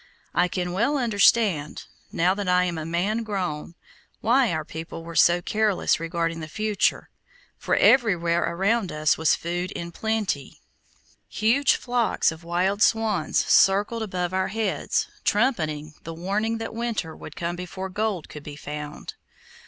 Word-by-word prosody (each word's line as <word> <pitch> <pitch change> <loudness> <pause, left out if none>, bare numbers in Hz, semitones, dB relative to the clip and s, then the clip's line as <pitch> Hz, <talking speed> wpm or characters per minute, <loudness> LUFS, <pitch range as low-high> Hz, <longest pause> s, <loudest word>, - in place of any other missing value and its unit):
I 175 +1 +3
can 180 0 -3
well 235 +11 +1
understand, 205 - +2 0.3
now 180 +2 +2
that 200 -1 -4
I 180 0 +4
am 175 -3 -2
a 155 - -5
man 190 +7 0
grown, 180 -7 -4 0.4
why 245 +2 +3
our 155 -2 -2
people 165 +1 -7
were 170 0 -9
so 175 +1 +4
careless 215 -4 +1
regarding 165 0 -2
the 155 - -6
future, 215 +4 -1 0.5
for - - 0
everywhere 175 -9 +4
around 190 +4 0
us 155 0 +2
was 160 -2 +3
food 175 +2 -3
in 170 0 -6
plenty. 210 - -2 0.7
Huge 235 +7 +3
flocks 245 -7 +1
of 160 +1 -11
wild 185 +4 0
swans 215 -8 +2
circled 205 +4 +3
above 185 -4 -3
our 190 0 +1
heads, 215 -1 -1 0.2
trumpeting 155 - 0
the 165 0 -7
warning 210 +6 -1
that 225 0 -5
winter 225 -8 -3
would - - -10
come 170 0 -3
before 180 +2 -6
gold 200 -2 -2
could 150 - -9
be 145 0 -9
found. 150 +1 -7
180 Hz, 150 wpm, -25 LUFS, 165-215 Hz, 0.7 s, I